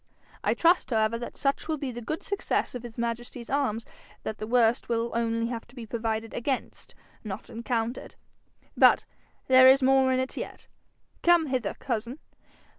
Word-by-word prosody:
I -, -, +2 dB
trust 340 Hz, -4 st, +3 dB
however 225 Hz, -1 st, +1 dB
that 240 Hz, -, -7 dB
such 275 Hz, -1 st, 0 dB
will 315 Hz, -1 st, -1 dB
be 275 Hz, -2 st, -4 dB
the 240 Hz, 0 st, -7 dB
good 310 Hz, +8 st, -4 dB
success 400 Hz, -1 st, -1 dB
of 250 Hz, -, -5 dB
his 235 Hz, -2 st, -10 dB
majesty's 235 Hz, +1 st, -4 dB
arms 255 Hz, -6 st, 0 dB, 0.4 s
that 215 Hz, -, -5 dB
the 215 Hz, -, -4 dB
worst 240 Hz, 0 st, +2 dB
will 230 Hz, 0 st, 0 dB
only 230 Hz, 0 st, 0 dB
have 230 Hz, -1 st, -5 dB
to 245 Hz, -, -19 dB
be 240 Hz, -3 st, -7 dB
provided 225 Hz, 0 st, -3 dB
against, 260 Hz, +2 st, -4 dB, 0.3 s
not 200 Hz, -4 st, -7 dB
encountered. 235 Hz, +1 st, -3 dB, 0.6 s
But -, -, +5 dB, 0.4 s
there 260 Hz, 0 st, +7 dB
is 265 Hz, +1 st, +6 dB
more 265 Hz, 0 st, +4 dB
in 255 Hz, -, +2 dB
it 260 Hz, 0 st, -2 dB
yet. -, -, -6 dB, 0.6 s
Come 345 Hz, -2 st, +5 dB
hither, 255 Hz, -7 st, -2 dB
cousin. 240 Hz, +1 st, -3 dB
240 Hz, 170 wpm, -27 LUFS, 230-265 Hz, 0.6 s, there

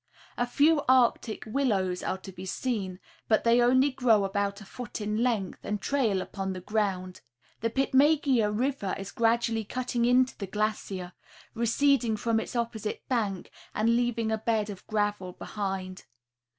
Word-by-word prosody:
A 245 Hz, -, 0 dB
few 295 Hz, +4 st, +4 dB
Arctic 245 Hz, -3 st, +3 dB
willows 210 Hz, -7 st, 0 dB
are 190 Hz, -, -2 dB
to 190 Hz, 0 st, -10 dB
be 185 Hz, 0 st, -10 dB
seen, 190 Hz, -2 st, -3 dB, 0.3 s
but 220 Hz, -, +3 dB
they 235 Hz, +1 st, +4 dB
only 260 Hz, +3 st, +4 dB
grow 235 Hz, -6 st, +3 dB
about 200 Hz, +1 st, -1 dB
a 215 Hz, -, -11 dB
foot 245 Hz, +2 st, -7 dB
in 210 Hz, +1 st, -1 dB
length, 225 Hz, -7 st, 0 dB
and 210 Hz, 0 st, -2 dB
trail 220 Hz, -6 st, +1 dB
upon 190 Hz, -1 st, -4 dB
the 185 Hz, -, -6 dB
ground. 185 Hz, -2 st, -2 dB, 0.4 s
The 230 Hz, -, 0 dB
Pitmegea 270 Hz, -2 st, +3 dB
river 240 Hz, -3 st, -1 dB
is 195 Hz, 0 st, -7 dB
gradually 230 Hz, -1 st, +1 dB
cutting 240 Hz, +1 st, -1 dB
into 250 Hz, +1 st, +3 dB
the 200 Hz, -, -4 dB
glacier, 195 Hz, -3 st, -3 dB, 0.4 s
receding 235 Hz, 0 st, +2 dB
from 225 Hz, 0 st, +1 dB
its 225 Hz, -, -6 dB
opposite 230 Hz, -3 st, -3 dB
bank 210 Hz, -7 st, -1 dB, 0.2 s
and 230 Hz, +2 st, +3 dB
leaving 235 Hz, -2 st, 0 dB
a 220 Hz, -, 0 dB
bed 215 Hz, -2 st, 0 dB
of 195 Hz, -, -11 dB
gravel 205 Hz, -4 st, -1 dB
behind. 190 Hz, -2 st, -5 dB
220 Hz, 155 wpm, -28 LUFS, 195-245 Hz, 0.4 s, few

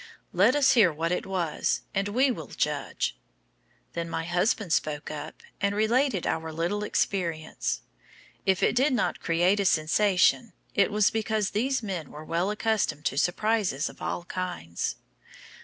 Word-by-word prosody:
"Let 205 Hz, +9 st, +4 dB
us 290 Hz, -2 st, +5 dB
hear 205 Hz, -8 st, +5 dB
what 165 Hz, +3 st, -2 dB
it 180 Hz, -, -1 dB
was 175 Hz, -5 st, -1 dB
and 195 Hz, +1 st, 0 dB
we 255 Hz, +6 st, +2 dB
will 160 Hz, -, -6 dB
judge." -, -, -2 dB, 0.8 s
Then 170 Hz, 0 st, -3 dB
my 165 Hz, -, -2 dB
husband 175 Hz, +2 st, 0 dB
spoke 150 Hz, -1 st, -1 dB
up, 465 Hz, -, -8 dB, 0.2 s
and 200 Hz, 0 st, +1 dB
related 225 Hz, -, +2 dB
our 160 Hz, 0 st, -2 dB
little 170 Hz, +6 st, -1 dB
experience. 170 Hz, -6 st, -1 dB, 0.6 s
If 190 Hz, -2 st, +1 dB
it -, -, +3 dB
did 265 Hz, +3 st, +3 dB
not 245 Hz, -, 0 dB
create 175 Hz, +4 st, +2 dB
a 200 Hz, -, +1 dB
sensation, 185 Hz, +5 st, +3 dB, 0.2 s
it 200 Hz, -, +3 dB
was 210 Hz, 0 st, +3 dB
because 220 Hz, -2 st, -1 dB
these 255 Hz, +4 st, 0 dB
men 180 Hz, -8 st, -4 dB
were 150 Hz, +1 st, -10 dB
well 170 Hz, +4 st, 0 dB
accustomed 210 Hz, -7 st, 0 dB
to 135 Hz, -, 0 dB
surprises 190 Hz, -4 st, +1 dB
of -, -, -15 dB
all 175 Hz, -, -3 dB
kinds. 175 Hz, -, -4 dB
190 Hz, 155 wpm, -27 LUFS, 165-215 Hz, 0.8 s, us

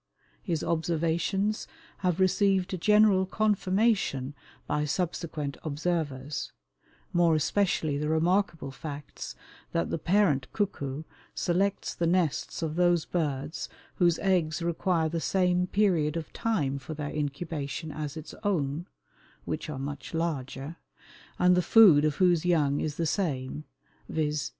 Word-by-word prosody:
His 170 Hz, -6 st, -2 dB
observations 170 Hz, +5 st, 0 dB, 0.3 s
have 180 Hz, -2 st, 0 dB
received 190 Hz, -1 st, +2 dB
general 210 Hz, -2 st, +5 dB
confirmation 200 Hz, -, +1 dB, 0.3 s
by 150 Hz, 0 st, 0 dB
subsequent 155 Hz, -2 st, -2 dB
observers, 150 Hz, -3 st, -2 dB, 0.6 s
more 170 Hz, -2 st, +4 dB
especially 155 Hz, -2 st, +1 dB
the 150 Hz, +1 st, -1 dB
remarkable 165 Hz, -1 st, +1 dB
facts 145 Hz, 0 st, -7 dB, 0.4 s
that 85 Hz, -, 0 dB
the -, -, -1 dB
parent 165 Hz, -7 st, +2 dB
cuckoo 150 Hz, -9 st, -2 dB, 0.3 s
selects 195 Hz, +3 st, 0 dB
the 170 Hz, -, -1 dB
nests 170 Hz, -2 st, 0 dB
of 160 Hz, 0 st, -2 dB
those 175 Hz, -2 st, +3 dB
birds 150 Hz, -3 st, -2 dB, 0.3 s
whose 175 Hz, -2 st, +3 dB
eggs 170 Hz, -4 st, +1 dB
require 170 Hz, -1 st, +1 dB
the 165 Hz, +1 st, -2 dB
same 180 Hz, -1 st, +2 dB
period 175 Hz, -7 st, +2 dB
of 160 Hz, -, -6 dB
time 145 Hz, -12 st, 0 dB
for 155 Hz, +4 st, -7 dB
their 145 Hz, -1 st, -4 dB
incubation 150 Hz, +1 st, -3 dB
as 150 Hz, 0 st, -5 dB
its 155 Hz, -, -8 dB
own 170 Hz, -5 st, -1 dB, 0.6 s
(which -, -, -4 dB
are 150 Hz, -, -4 dB
much 145 Hz, +4 st, -6 dB
larger), 155 Hz, -1 st, -3 dB, 0.6 s
and 180 Hz, 0 st, +5 dB
the 180 Hz, -, +3 dB
food 180 Hz, -5 st, +7 dB
of 150 Hz, -2 st, +1 dB
whose 175 Hz, -2 st, +3 dB
young 150 Hz, -5 st, +2 dB
is 150 Hz, -1 st, -2 dB
the 165 Hz, -, 0 dB
same, 150 Hz, -5 st, -2 dB, 0.4 s
viz. 150 Hz, -2 st, -1 dB
165 Hz, 125 wpm, -28 LUFS, 150-180 Hz, 0.6 s, food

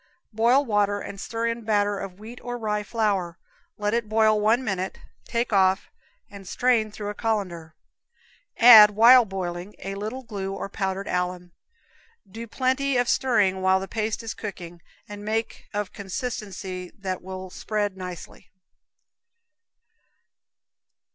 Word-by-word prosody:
Boil 240 Hz, +6 st, +3 dB
water 205 Hz, -3 st, +1 dB
and 200 Hz, -1 st, -8 dB
stir 230 Hz, 0 st, -3 dB
in 230 Hz, 0 st, -2 dB
batter 205 Hz, -2 st, +1 dB
of 190 Hz, -2 st, -7 dB
wheat 230 Hz, +3 st, -10 dB
or 245 Hz, 0 st, -5 dB
rye 210 Hz, -2 st, -1 dB
flour. 205 Hz, -6 st, -1 dB, 0.4 s
Let 210 Hz, +1 st, -1 dB
it 230 Hz, -2 st, -1 dB
boil 215 Hz, -1 st, +3 dB
one 225 Hz, +4 st, +3 dB
minute, 190 Hz, -4 st, -3 dB, 0.3 s
take 235 Hz, -1 st, -2 dB
off 190 Hz, -1 st, +2 dB, 0.4 s
and 200 Hz, -2 st, -12 dB
strain 235 Hz, -2 st, +1 dB
through 205 Hz, 0 st, -6 dB
a -, -, -4 dB
colander. 185 Hz, -8 st, -3 dB, 0.8 s
Add, 225 Hz, -3 st, +10 dB
while 235 Hz, +4 st, +7 dB
boiling, 185 Hz, 0 st, -5 dB
a 195 Hz, -, -6 dB
little 215 Hz, +6 st, -5 dB
glue 195 Hz, -4 st, -5 dB
or 195 Hz, -, -5 dB
powdered 195 Hz, 0 st, -3 dB
alum. 180 Hz, 0 st, -3 dB, 0.8 s
Do 225 Hz, +4 st, -8 dB
plenty 260 Hz, +3 st, 0 dB
of 245 Hz, -1 st, +1 dB
stirring 205 Hz, -9 st, +2 dB
while 190 Hz, 0 st, +3 dB
the 195 Hz, -, -6 dB
paste 220 Hz, +1 st, -3 dB
is 225 Hz, -, -4 dB
cooking, 175 Hz, -5 st, -8 dB, 0.3 s
and 205 Hz, 0 st, -9 dB
make 220 Hz, +2 st, -3 dB
of 205 Hz, -1 st, -4 dB
consistency 190 Hz, -3 st, -5 dB
that 190 Hz, -2 st, -4 dB
will 185 Hz, 0 st, -8 dB
spread 205 Hz, -1 st, -2 dB
nicely. 180 Hz, -2 st, -9 dB
205 Hz, 140 wpm, -25 LUFS, 190-225 Hz, 0.8 s, Add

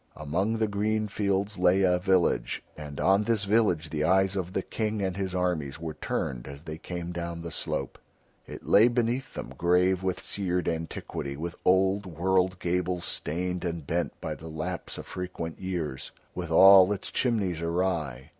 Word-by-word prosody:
Among 90 Hz, +10 st, -1 dB
the 110 Hz, -1 st, +1 dB
green 105 Hz, +1 st, 0 dB
fields 100 Hz, -1 st, -1 dB
lay 90 Hz, +2 st, +4 dB
a 90 Hz, -1 st, +3 dB
village, 95 Hz, -1 st, +1 dB
and 75 Hz, -2 st, -8 dB
on 95 Hz, +2 st, +4 dB
this 110 Hz, -1 st, 0 dB
village 100 Hz, -7 st, +2 dB
the 75 Hz, -1 st, -1 dB
eyes 95 Hz, +3 st, +3 dB
of 95 Hz, -1 st, -3 dB
the -, -, -1 dB
King 110 Hz, -1 st, -2 dB
and 95 Hz, -2 st, -1 dB
his 95 Hz, -2 st, -3 dB
armies 85 Hz, -6 st, -1 dB
were 80 Hz, -1 st, -5 dB
turned -, -, -3 dB
as 70 Hz, +2 st, -9 dB
they 80 Hz, -1 st, -7 dB
came 85 Hz, 0 st, -5 dB
down 85 Hz, -1 st, -5 dB
the 85 Hz, -, -6 dB
slope. -, -, -3 dB, 0.5 s
It -, -, -9 dB
lay 110 Hz, +3 st, +6 dB
beneath 120 Hz, +2 st, -1 dB
them, 65 Hz, -, -6 dB
grave 90 Hz, +3 st, +3 dB
with 95 Hz, -1 st, -1 dB
seared 90 Hz, -3 st, -1 dB
antiquity, 80 Hz, -4 st, -4 dB
with 85 Hz, +3 st, -5 dB
old 95 Hz, +2 st, +3 dB
world 90 Hz, +2 st, +1 dB
gables 90 Hz, 0 st, -1 dB
stained 90 Hz, +3 st, -2 dB
and 85 Hz, -4 st, -3 dB
bent 85 Hz, +4 st, -2 dB
by 80 Hz, -, -4 dB
the 75 Hz, +2 st, -10 dB
lapse 80 Hz, +3 st, -4 dB
of -, -, -7 dB
frequent 90 Hz, -3 st, -5 dB
years, 85 Hz, -8 st, -4 dB, 0.2 s
with -, -, -5 dB
all 95 Hz, 0 st, +8 dB
its 100 Hz, -2 st, -3 dB
chimneys 100 Hz, -9 st, 0 dB
awry. 85 Hz, -6 st, -1 dB
90 Hz, 175 wpm, -28 LUFS, 85-95 Hz, 0.5 s, all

